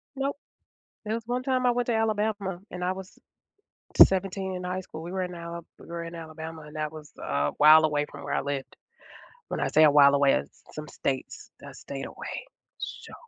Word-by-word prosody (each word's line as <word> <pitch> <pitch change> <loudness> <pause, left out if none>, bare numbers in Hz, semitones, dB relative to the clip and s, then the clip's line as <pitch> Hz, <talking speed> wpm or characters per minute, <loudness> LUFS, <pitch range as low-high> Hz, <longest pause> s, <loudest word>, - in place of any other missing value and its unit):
Nope. 275 +1 -1 0.7
There 215 +1 -1
was 230 - -3
one 245 +1 -1
time 255 -1 +1
I 245 - +6
went 245 0 0
to 235 - +1
Alabama, 210 -4 0
and 180 0 -4
I 180 - +1
was 190 0 -10 0.9
17 190 0 -2
in 180 - -5
high 180 +1 -2
school. 160 -3 -9
We 170 - -6
were 190 0 -1
in 180 0 -5
Al 170 0 -7
we - - -14
were 170 0 -5
in 170 0 -7
Alabama, 160 -1 -8
and 150 +1 -12
that 155 -1 -2
was 155 -1 -11
a 70 +1 0
while 155 +1 +8
away 150 -1 +1
from - - -10
where 145 - -3
I - - +1
lived. 140 -1 -4 0.7
When - - -3
I - - +1
say 155 - +5
a 150 - +8
while 140 -1 +7
away, 140 -1 +5
it's - - -3
some 150 0 -6
states 135 -2 -4
I - - -8
stayed 135 -1 -7
away, - - -7 0.3
so - - -7
170 Hz, 210 wpm, -27 LUFS, 150-195 Hz, 0.9 s, while